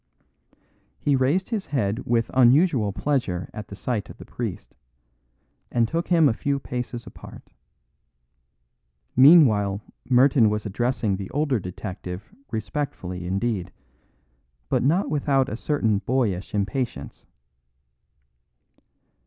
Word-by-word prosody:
He 145 - +1
raised 140 +9 +1
his 220 -5 -3
head 110 -5 -1
with 115 -1 +1
unusual 130 - +4
pleasure 100 -9 -2
at 105 -2 -7
the 100 - -9
sight 105 +1 -3
of - - -11
the - - -11
priest, - - -6 1.0
and 115 -2 +2
took 165 +6 -2
him 165 -4 +5
a 115 - +2
few 140 +4 -1
paces 125 -2 -5
apart. - - -13 1.6
Meanwhile 120 - +6 0.3
Merton 125 -2 +5
was 105 +1 -2
addressing 115 -1 -1
the 95 -1 -6
older 145 -4 0
detective 90 0 -7 0.2
respectfully 105 -7 -4
indeed, 100 0 -2 1.0
but - - +2
not 160 +6 +1
without 140 -3 +1
a 105 - -4
certain 115 -6 0
boyish 110 -6 -1
impatience. 105 - -3
120 Hz, 110 wpm, -24 LUFS, 100-140 Hz, 1.6 s, Meanwhile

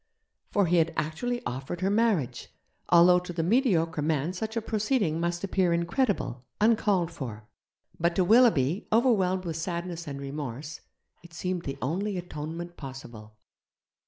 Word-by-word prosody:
For 200 -2 +2
he 175 +1 +2
had 165 0 +2
actually 240 +11 -2
offered 135 +8 -4
her 190 +1 +1
marriage, 200 - +1 0.4
although 175 +1 +7
to 180 0 -8
the 165 -1 -2
mediocre 170 - +2
man 155 +2 0
such 220 +5 -4
a - - +1
proceeding 215 - 0
must 175 +1 -2
appear 185 -3 +1
incredible, 170 - 0 0.2
uncalled 205 -5 +2
for. 115 -9 -7 0.5
But 170 +1 +1
to 185 - +3
Willoughby, 195 - +4
overwhelmed 195 -6 +2
with 165 -2 -3
sadness 170 0 -4
and 140 -1 -5
remorse, 140 +1 -6 0.4
it 170 -1 -15
seemed 180 0 -3
the 135 - -4
only 190 +8 -1
atonement 170 0 -6
possible. 120 -6 -10
170 Hz, 145 wpm, -28 LUFS, 150-195 Hz, 0.5 s, although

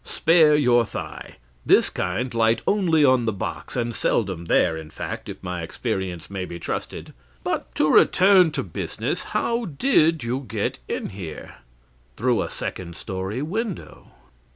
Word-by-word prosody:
Spare 160 -2 +4
your 125 -5 +4
thigh; - - -7 0.3
this - - +4
kind 125 0 -2
light 115 0 +2
only 170 -7 +3
on 130 -3 +4
the 110 - +1
box, 100 - -5
and 120 -1 -1
seldom 95 -7 0
there, 80 0 +3
in 80 -1 -8
fact, - - -6
if - - -9
my 90 -1 -4
experience 90 +1 -4
may 95 -1 -4
be 85 -1 -6
trusted. 85 - -5 0.3
But - - -3
to - - +2
return 185 -2 +6
to - - -2
business: 85 - -3
how 235 0 -1
did 160 - +2
you 125 +4 -2
get 105 -3 -2
in - - -3
here?' 90 -5 -8 0.6
"'Through 125 0 +2
a - - -3
second 85 -2 -5
story 95 +9 -4
window.' 205 +4 -5
120 Hz, 155 wpm, -23 LUFS, 95-155 Hz, 0.6 s, return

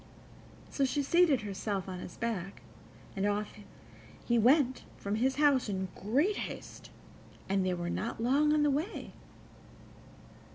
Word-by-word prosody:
So 280 - 0
she 280 +2 +1
seated 325 -2 +4
herself 200 -1 -3
on 185 -1 -5
his 180 - -9
back, 200 -5 -4 0.5
and 195 - -2
off 205 +1 -1 0.7
he 235 -1 +2
went 260 +2 +3
from 200 - -4
his 260 +4 +1
house 280 -5 +3
in 190 -1 -2
great 285 - +1
haste, - - -7 0.6
and 195 0 +1
they 185 -1 0
were 175 0 -4
not 220 +6 -3
long 280 +6 +3
on 300 -1 +3
the 295 - +3
way. 315 +10 -3
235 Hz, 140 wpm, -31 LUFS, 195-285 Hz, 0.7 s, seated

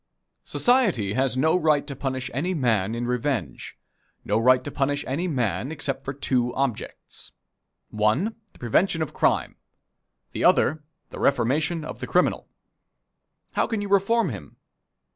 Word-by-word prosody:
Society 200 - +2
has 130 0 +1
no 160 +6 +3
right 155 -5 +2
to 140 - -6
punish 130 -1 -3
any 175 +9 -1
man 115 - +1
in 120 +1 -3
revenge 125 +2 -3 0.5
no 105 +2 +1
right 125 +2 +4
to 145 - -6
punish 145 +1 -1
any 155 +8 -1
man 125 - -1
except 145 -3 -3
for 135 - -3
two 125 -3 0
objects 135 -5 -4 0.6
one, 110 - +1 0.2
the - - -21
prevention 160 - +1
of 155 - -7
crime; - - +1 0.7
the - - -3
other, 155 +2 +3 0.3
the - - -8
reformation 145 +5 +1
of - - -7
the - - -5
criminal. - - +1 1.0
How - - 0
can 225 - -2
you 205 0 -4
reform 200 +4 +3
him? - - -9
135 Hz, 145 wpm, -25 LUFS, 125-160 Hz, 1.0 s, right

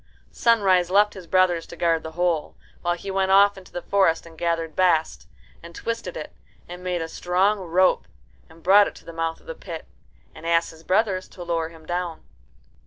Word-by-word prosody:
Sunrise 195 -7 +3
left 205 +2 +4
his 185 -3 -11
brothers 180 -2 +2
to - - -10
guard 165 -2 +1
the 160 0 -8
hole, 170 -2 -1 0.3
while 175 0 0
he 195 +3 -6
went 190 0 +1
off 200 +1 +6
into 190 -1 -14
the 175 - -6
forest 180 -5 +2
and 165 -1 -13
gathered 165 -1 -2
bast, 170 -4 +1 0.3
and 170 0 -12
twisted 230 -6 -4
it, 155 - -7 0.3
and 180 +1 -9
made 180 -2 -1
a - - -5
strong 185 +5 +1
rope, 185 +1 +2 0.4
and 160 0 -18
brought 200 +3 +6
it - - -8
to - - -15
the 165 - -9
mouth 165 0 -2
of - - -24
the - - -6
pit, - - -8 0.5
and 165 - -9
asked 170 0 +2
his 160 0 -16
brothers 190 0 +1
to 180 - -10
lower 165 -2 -1
him 165 -1 -16
down. 175 -1 -3
175 Hz, 200 wpm, -24 LUFS, 165-190 Hz, 0.5 s, off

